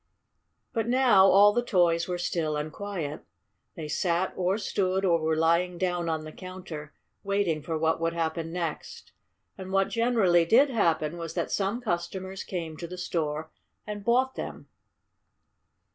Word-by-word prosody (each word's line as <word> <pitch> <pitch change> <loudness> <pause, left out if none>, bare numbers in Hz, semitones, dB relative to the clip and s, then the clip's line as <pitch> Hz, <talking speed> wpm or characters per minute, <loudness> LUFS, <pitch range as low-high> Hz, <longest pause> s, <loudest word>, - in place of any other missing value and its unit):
But 225 -1 -1
now 240 -6 +5
all 205 +2 +7
the 240 - +2
toys 175 -7 +2
were 180 -1 -2
still 160 -3 -1
and 150 +1 -4
quiet. 175 -7 -5 0.5
They 160 -2 -6
sat 175 +3 0
or 185 +2 +1
stood 190 -2 0
or 170 -2 +3
were 160 0 0
lying 170 +2 +2
down 175 -2 -1
on 160 -1 -2
the 155 - -8
counter, 180 -5 -9 0.3
waiting 200 -6 0
for 160 +2 -3
what 160 +1 +1
would 165 0 0
happen 165 0 -2
next. 170 -3 -5 0.5
And 190 0 -7
what 195 0 +2
generally 225 -8 +3
did 255 - +4
happen 165 -7 +1
was 165 -1 -6
that - - -2
some 205 +5 -1
customers 190 -1 -3
came 165 -4 -5
to 170 - -6
the 180 +2 -8
store 160 -3 -3 0.3
and 210 -1 -6
bought 255 +4 +2
them. - - -7
175 Hz, 160 wpm, -27 LUFS, 165-195 Hz, 0.5 s, all